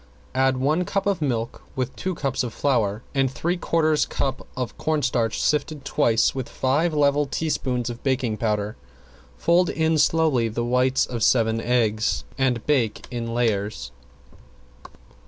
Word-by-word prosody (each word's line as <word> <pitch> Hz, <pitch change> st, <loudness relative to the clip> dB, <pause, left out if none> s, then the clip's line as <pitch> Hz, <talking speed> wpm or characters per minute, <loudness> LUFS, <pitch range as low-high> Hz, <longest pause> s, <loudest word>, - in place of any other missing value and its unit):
Add 130 Hz, 0 st, +2 dB
one 150 Hz, +7 st, +1 dB
cup 195 Hz, +2 st, -2 dB
of 200 Hz, -5 st, 0 dB
milk 120 Hz, -5 st, -2 dB
with 130 Hz, -1 st, -3 dB
two 185 Hz, -1 st, -3 dB
cups 135 Hz, -4 st, -1 dB
of 120 Hz, -3 st, -5 dB
flour 115 Hz, -6 st, 0 dB
and 135 Hz, -1 st, +2 dB
three 165 Hz, +8 st, -1 dB
quarters 155 Hz, -3 st, +1 dB
cup 135 Hz, -1 st, -3 dB
of 125 Hz, -3 st, -3 dB
cornstarch 125 Hz, -7 st, 0 dB
sifted 150 Hz, -1 st, 0 dB
twice 115 Hz, -4 st, +2 dB
with 130 Hz, -2 st, -4 dB
five 145 Hz, +6 st, +1 dB
level 145 Hz, -1 st, +2 dB
teaspoons 130 Hz, -5 st, -1 dB
of 120 Hz, 0 st, -5 dB
baking 130 Hz, -5 st, 0 dB
powder. 105 Hz, -1 st, -1 dB, 0.6 s
Fold 175 Hz, +1 st, +3 dB
in 160 Hz, -1 st, +1 dB
slowly 150 Hz, -6 st, +3 dB
the 120 Hz, +2 st, -2 dB
whites 125 Hz, +2 st, +2 dB
of 120 Hz, -2 st, -5 dB
seven 115 Hz, 0 st, +3 dB
eggs 115 Hz, -2 st, +1 dB
and 125 Hz, -4 st, 0 dB
bake 125 Hz, -8 st, 0 dB
in 115 Hz, -1 st, -4 dB
layers. 100 Hz, -, -1 dB
130 Hz, 145 wpm, -24 LUFS, 115-150 Hz, 0.6 s, Fold